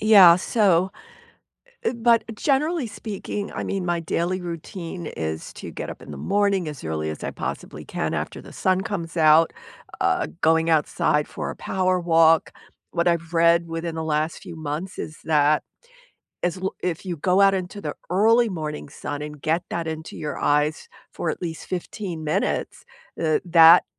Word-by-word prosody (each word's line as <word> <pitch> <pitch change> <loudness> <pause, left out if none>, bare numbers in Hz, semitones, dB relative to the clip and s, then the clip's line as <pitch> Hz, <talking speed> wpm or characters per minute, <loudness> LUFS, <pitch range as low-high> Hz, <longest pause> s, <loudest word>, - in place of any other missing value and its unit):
Yeah, 195 -6 +8
so 190 -2 +2 0.9
eh - - +1
but, 235 0 +4
generally 295 +3 +1
speaking, 205 0 -5
I - - -3
mean, 195 -2 -2
my 175 -1 0
daily 170 +3 -1
routine 170 0 -6
is 80 0 -4
to - - -8
get - - -6
up - - -9
in - - -10
the 70 - -7
morning 200 - +1
as 150 - -9
early 80 -1 -2
as 80 - -6
I - - -3
possibly - - -6
can - - -3
after - - -4
the - - -13
sun 185 0 +1
comes 175 -4 -4
out, 160 +1 +6 0.5
uh, - - +1
going 160 +1 +3
outside 150 -1 +2
for - - -5
a - - -5
power 185 -1 0
walk. 165 -2 +4 0.4
What 170 0 +1
I've 170 -1 0
read 170 0 +4
within 165 0 -4
the 160 - -3
last 155 +1 0
few 170 - -9
months 160 +4 -5
is 155 - -6
that 150 -1 +3 0.8
is 175 +1 0
l 190 +1 -3
if 180 +1 -2
you 175 - -3
go 180 +5 +2
out 195 0 +6
into 190 +2 -4
the 150 -6 -4 0.2
early 225 +5 +4
morning 155 -5 -5
sun 145 +1 -6
and 150 -1 -7
get 160 +4 +1
that 170 -1 -2
into 160 0 -6
your 150 - -4
eyes 150 +2 +1 0.2
for 165 - -2
at - - -5
least 165 -2 -5
15 180 -2 -5
minutes, 150 - -1 0.4
uh, 155 -2 +2
that 165 0 +8
170 Hz, 175 wpm, -24 LUFS, 155-190 Hz, 0.9 s, Yeah